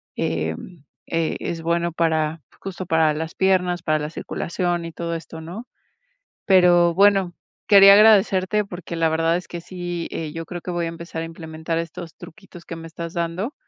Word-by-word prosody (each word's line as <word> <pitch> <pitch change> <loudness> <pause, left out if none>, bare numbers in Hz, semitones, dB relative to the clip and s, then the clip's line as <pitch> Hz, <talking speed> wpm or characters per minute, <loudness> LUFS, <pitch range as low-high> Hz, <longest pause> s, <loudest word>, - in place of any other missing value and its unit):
em, 80 - -4 0.2
eh, 165 -1 -1
es 165 -1 -4
bueno 170 +1 0
para 160 -1 0 0.2
justo 185 -1 -6
para 160 -2 +3
las 160 +2 -5
piernas, 180 -2 +1
para 155 -1 +1
la 150 +1 -4
circulación 175 +1 -3
y 165 - -7
todo 170 +2 -4
esto, 160 0 -8
¿no?, 190 +10 -8 0.8
pero 175 -3 +5
bueno, 195 -2 +4 0.4
quería 200 -1 +9
agradecerte 210 -1 +4
porque, 175 -3 -7
la 165 -1 +2
verdad 165 +1 +1
es 180 - -8
que 175 - -5
sí, 175 -1 -5
eh, 155 -2 -4
yo 165 0 -5
creo 175 -1 -7
que 180 - -5
voy 175 -1 -1
a - - -2
empezar 165 0 -7
a - - -3
implementar 165 0 -5
estos 165 0 -7
truquitos 175 -1 -13
que 165 - -7
me 165 0 -9
estás 170 +1 -7
dando, 170 - -3
170 Hz, 180 wpm, -22 LUFS, 165-180 Hz, 0.8 s, quería